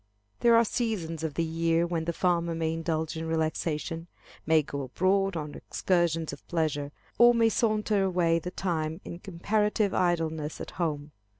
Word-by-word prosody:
There 235 -1 +5
are 230 0 +5
seasons 185 -10 -2
of 155 -3 -3
the 165 - +1
year 165 +1 +1
when 170 -2 -2
the 170 - 0
farmer 170 -1 0
may 160 0 -1
indulge 160 -1 -2
in 160 0 -4
relaxation, 160 0 -2 0.4
may 160 -1 +5
go 140 0 -5
abroad 185 +7 +1
on 150 -2 -5
excursions 170 -3 0
of - - -12
pleasure, 150 -4 -1 0.3
or 240 0 +7
may 230 -1 +4
saunter 215 -2 +1
away 175 -3 +2
the 180 - -5
time 165 -3 -2
in 170 - -7
comparative 205 +3 0
idleness 160 -4 0
at - - -6
home. 150 -4 -3
165 Hz, 165 wpm, -28 LUFS, 160-185 Hz, 0.4 s, or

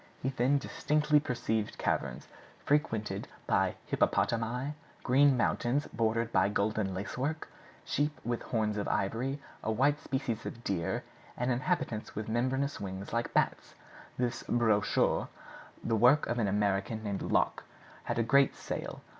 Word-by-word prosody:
He 130 - +1
then 135 +2 +2
distinctly 150 +2 +2
perceived 115 -6 -2
caverns - - -1 0.4
frequented 110 -9 0 0.2
by - - +2
hippopotami, 125 +5 +1 0.3
green 135 +1 +5
mountains 125 +4 +1
bordered 115 0 +1
by 95 -1 +3
golden 105 -1 0
lace 100 +6 -5
work, 155 +4 -2 0.4
sheep 150 +1 0
with 120 0 -1
horns 110 -2 -1
of 100 - -2
ivory, 125 +8 -1 0.2
a 110 - 0
white 140 +6 +2
species 130 -4 -2
of 115 - -8
deer 85 -7 -1 0.3
and 125 +1 0
inhabitants 120 -4 -1
with 105 +1 -4
membranous 130 +5 0
wings, 95 +1 -6
like 115 0 -1
bats. - - 0 0.4
This 125 -1 -1
brochure, 110 -4 +2 0.6
the 115 - +1
work 125 +7 +5
of 120 +1 -1
an 110 - +2
American 100 +2 0
named 100 -2 -2
Locke, - - +1 0.4
had - - -2
a 115 - +3
great 140 +4 +4
sale. - - -5
115 Hz, 140 wpm, -31 LUFS, 105-135 Hz, 0.6 s, green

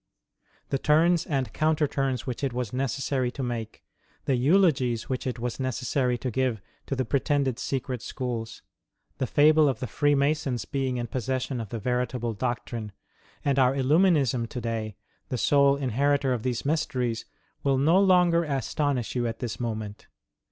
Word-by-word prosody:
" - - -38
The 135 - +1
turns 165 +4 +3
and 135 -6 -1
counter 155 -1 +2
turns 135 -3 -1
which 125 +1 -5
it 135 -3 0
was 125 -3 -3
necessary 130 0 -1
to 135 - -4
make; 115 -3 -5 0.4
the 135 - +2
eulogies 130 - +2
which 130 0 -2
it 125 - -2
was 120 +1 -4
necessary 130 -1 0
to 125 +1 -3
give 125 -2 0 0.3
to 135 - -1
the 130 -1 -1
pretended 140 -1 0
secret 130 -3 -3
schools; 120 -3 -5 0.6
the 130 - 0
fable 155 0 +5
of 125 -5 -2
the 125 - -3
Freemasons 140 -2 +1
being 130 0 -2
in 120 - -2
possession 130 +1 -2
of 110 - -7
the 115 - -4
veritable 125 0 -1
doctrine; 115 -2 -4 0.5
and 140 -1 +2
our 130 0 +4
Illuminism 140 - +3
to 125 - -5
day, 110 -3 -3 0.3
the 125 - -2
sole 140 +3 +4
inheritor 140 +1 +1
of 120 - -2
these 125 +1 -2
mysteries, 130 -6 -1 0.4
will 135 -1 +2
no 160 +7 +4
longer 180 -3 +4
astonish 140 -3 -1
you 120 -2 0
at 115 - -4
this 120 -4 -5
moment. 110 -3 -5
130 Hz, 165 wpm, -26 LUFS, 120-140 Hz, 0.6 s, fable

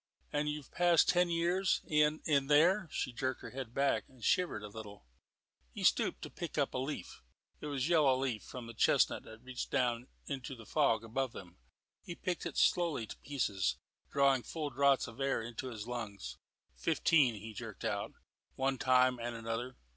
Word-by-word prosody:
"And 150 0 +1
you've 150 -2 -5
passed 175 -2 +4
ten 180 0 +4
years 175 +3 +1
in 150 0 +2
in 140 -3 +2
there." 170 +6 +4
She 130 - -2
jerked 130 +2 -2
her - - -7
head 130 -3 -6
back 140 +2 +1
and 130 -3 -17
shivered 170 -11 +1
a - - -5
little. 105 - -10 0.6
He - - -8
had - - +7
stooped - - -2
to - - -7
pick - - -6
up - - +1
a - - -1
leaf. 135 -8 -5 0.4
It - - -6
was 135 -3 -1
a - - -1
yellow 150 -6 +5
leaf 130 -5 -1
from 125 -2 -8
a 115 - -8
chestnut 110 - +3
that 110 +2 -12
reached 130 -1 -5 0.5
into 135 -1 -5
the 115 -2 -12
fog 115 -7 +2
above 125 +3 -2
them. 90 -8 -11 0.4
He 175 - -7
picked 180 0 -3
it - - -7
slowly 170 -10 +2
to - - -9
pieces, 100 - -1 0.3
drawing 140 -2 +4
full 150 +2 -4
draughts 140 -1 +3
of 115 +3 -11
air 135 0 +1
into 120 +2 -5
his 110 -3 -6
lungs. 115 -5 -6 0.4
"Fifteen," 125 - +3
he 110 +2 -8
jerked - - -7
out, - - -2 0.4
"one 135 0 0
time 130 -2 +4
and 120 0 -4
another. 115 +2 -4
130 Hz, 185 wpm, -34 LUFS, 115-150 Hz, 0.6 s, had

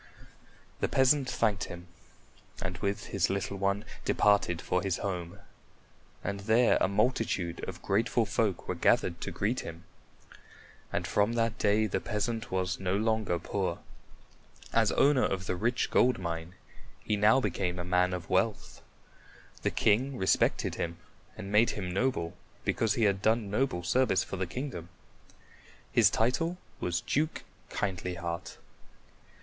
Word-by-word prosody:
The - - +1
peasant 130 0 +3
thanked 105 -6 +1
him 85 0 -9 0.7
and - - -4
with 100 0 -2
his 95 -3 +2
little 100 0 -2
one 100 +2 0 0.2
departed 100 -4 +3
for 90 - 0
his 95 -2 -1
home, 90 -4 -4 0.9
and 100 +1 -3
there 110 +4 +4
a - - +4
multitude 100 -4 0
of 90 -1 -9
grateful 110 +3 +1
folk 105 -3 -1
were - - 0
gathered - - +2
to - - -3
greet 110 +5 -1
him. 85 +1 -8 1.1
And - - -1
from 105 +3 +1
that 115 -1 0
day 105 +1 +3
the 95 -2 -1
peasant 115 +2 -2
was 95 0 -1
no 95 0 0
longer 110 -4 +1
poor. - - -2 1.0
As - - +4
owner 140 -2 +4
of 95 -1 -1
the 90 - -1
rich 120 +6 0
gold 125 -1 +4
mine, 85 -1 -5 0.5
he 105 - 0
now 105 +5 +5
became 90 -5 -1
a 90 - -4
man 90 0 +2
of 90 -2 -4
wealth. 100 +3 0 0.8
The - - +1
king 130 +6 +2
respected 95 - +2
him 85 0 -3 0.4
and 100 - -6
made 105 +3 +5
him 90 -3 -3
noble 95 -6 0 0.3
because 110 -3 +1
he 115 - +1
had 100 -2 +2
done 110 -2 +1
noble 105 -6 0
service 125 -3 +2
for 95 - -6
the 95 0 -2
kingdom. 120 - -5 1.0
His - - +5
title 165 +10 +1 0.2
was 85 -1 -1
Duke 155 +3 -1 0.3
Kindlyheart. 90 -1 -3
100 Hz, 145 wpm, -30 LUFS, 90-115 Hz, 1.1 s, now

